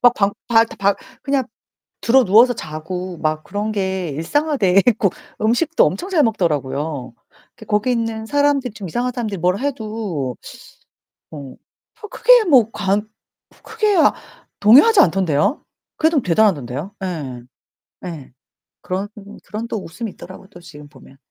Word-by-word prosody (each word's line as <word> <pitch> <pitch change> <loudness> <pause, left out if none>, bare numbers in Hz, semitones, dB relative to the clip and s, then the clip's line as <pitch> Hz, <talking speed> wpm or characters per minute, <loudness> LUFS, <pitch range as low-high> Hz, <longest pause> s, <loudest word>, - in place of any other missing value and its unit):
막 245 0 +6
방 200 0 +1 0.2
발다박 225 -4 +2 0.3
그냥 275 -1 0 0.6
드러누워서 240 0 +5
자고 175 +1 -6
막 155 0 -2
그런 210 +1 -3
게 190 -4 -2
일상화 290 - -1
돼 195 -4 +4
있고 220 -4 +3 0.3
음식도 245 +10 +2
엄청 365 - -3
잘 340 -6 +3
먹더라고요. 150 - -2 0.4
그 220 - -14
거기 210 +4 0
있는 225 -2 -2
사람들이 285 -2 +1
좀 210 -3 -8
이상한 245 +8 -2
사람들이 215 -6 -4
뭘 180 +3 +1
해도 215 - -4 1.0
어 140 -4 -9 0.5
뭐 425 - -7
크게 - - +5
뭐 255 - +5
관 205 +1 -1 0.5
크게 430 -2 0 0.6
동요하지 280 - +6
않던데요? 180 - +2 0.3
그래도 320 -2 +2
대단하던데요? 170 - 0
예. 145 -9 -5 0.6
예. 160 -8 -8 0.5
그런 190 +2 -3 0.4
그런 215 +5 -6
또 220 - -3
웃음이 220 +7 -7
있더라고 185 +1 -12
또 195 - -15
지금 150 -4 -13
보면. 135 -2 -18
205 Hz, 280 characters per minute, -19 LUFS, 170-245 Hz, 1.0 s, 막